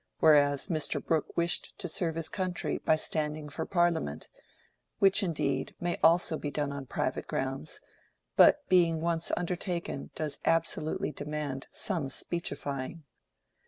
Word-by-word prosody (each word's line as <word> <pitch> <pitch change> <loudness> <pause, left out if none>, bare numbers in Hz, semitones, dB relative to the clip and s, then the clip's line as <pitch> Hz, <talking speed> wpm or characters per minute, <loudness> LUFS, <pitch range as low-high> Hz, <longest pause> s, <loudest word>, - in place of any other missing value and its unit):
whereas 145 -3 +5
Mr. 155 -3 0
Brooke 160 -2 -1
wished 170 0 0
to 180 - -4
serve 165 -1 0
his 165 -1 -2
country 185 -2 -2
by 160 - +3
standing 150 -1 -1
for 160 +3 -4
Parliament—which, 175 - -1
indeed, 145 -7 -1
may 175 0 -2
also 165 -1 +4
be 145 - -3
done 145 -1 -2
on 140 -2 -6
private - - -2
grounds, 135 +3 -3 0.5
but 295 -1 +6
being 170 -3 +4
once 170 0 0
undertaken 175 -3 -3
does 150 -2 -3
absolutely 165 -2 0
demand 145 -2 -4
some 165 -9 0
speechifying. 145 -1 -3
160 Hz, 125 wpm, -30 LUFS, 145-175 Hz, 0.5 s, but